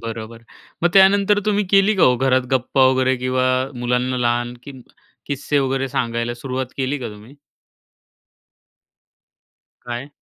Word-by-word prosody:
बरोबर, 115 0 -7 0.4
मग 175 - +4
त्यानंतर 200 +2 +4
तुम्ही 210 -1 +1
केली 195 +2 +4
का 185 - +2
हो 125 -4 +5
घरात 130 0 +1
गप्पा 130 +1 +2
वगैरे 130 0 +1
किंवा 130 0 0 0.3
मुलांना 125 +1 -1
लहान 120 0 -1 0.7
किस्से 145 +1 -1
वगैरे 135 0 -1
सांगायला 115 -1 -2
सुरुवात 130 0 -4
केली 135 +2 -2
का 125 - -5
तुम्ही? 110 +7 -15 2.5
काय? 120 +3 -6
130 Hz, 125 wpm, -20 LUFS, 120-140 Hz, 2.5 s, हो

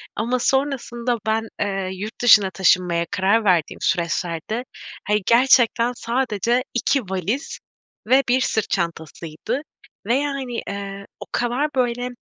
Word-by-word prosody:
Ama 240 +4 -1
sonrasında 250 -3 0
ben, 220 +1 0
eee, 195 -2 -1
yurt 205 +4 -7
dışına 210 -5 +7
taşınmaya 180 -2 +2
karar 200 +3 +2
verdiğim 175 -5 +1
süreçlerde, 175 +6 -1 0.4
hani, 210 0 +2
gerçekten 240 0 +4
sadece 235 0 0
2 270 +3 +1
valiz 195 - -3 0.5
ve 260 +3 +5
1 255 +2 +3
sırt 220 -4 0
çantasıydı 170 - -3 0.5
ve, 235 - +3
yani, 275 -4 -2
eee, 200 0 -6
o - - -7
kadar, 245 +5 0
böyle, 245 -1 0
225 Hz, 125 wpm, -22 LUFS, 190-250 Hz, 0.5 s, dışına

